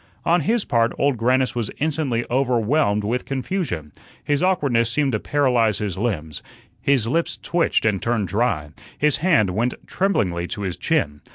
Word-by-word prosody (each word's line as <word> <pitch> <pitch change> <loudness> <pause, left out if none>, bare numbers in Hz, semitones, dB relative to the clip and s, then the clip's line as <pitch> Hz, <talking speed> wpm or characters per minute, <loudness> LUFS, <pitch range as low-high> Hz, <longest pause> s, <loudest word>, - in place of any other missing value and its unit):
On 175 +1 +3
his 225 +8 0
part, 115 -1 +1
Old 140 -1 +2
Grannis 125 +3 +1
was 120 -4 -2
instantly 140 -6 -1
overwhelmed 125 -3 +1
with 120 +4 -1
confusion. 130 - -3 0.3
His 145 0 0
awkwardness 140 -11 +2
seemed 140 +3 +1
to 110 - 0
paralyze 125 -7 +2
his 100 -4 -3
limbs, 85 -9 -3 0.4
his 135 -5 +2
lips 165 +7 0
twitched 170 -8 0
and 105 -4 +1
turned 115 -4 0
dry, 100 -7 -1 0.3
his 150 -1 +2
hand 150 - +3
went 115 +6 0
tremblingly 90 - 0
to 105 0 -5
his 95 -3 -2
chin. 75 0 -1
120 Hz, 160 wpm, -22 LUFS, 105-145 Hz, 0.4 s, On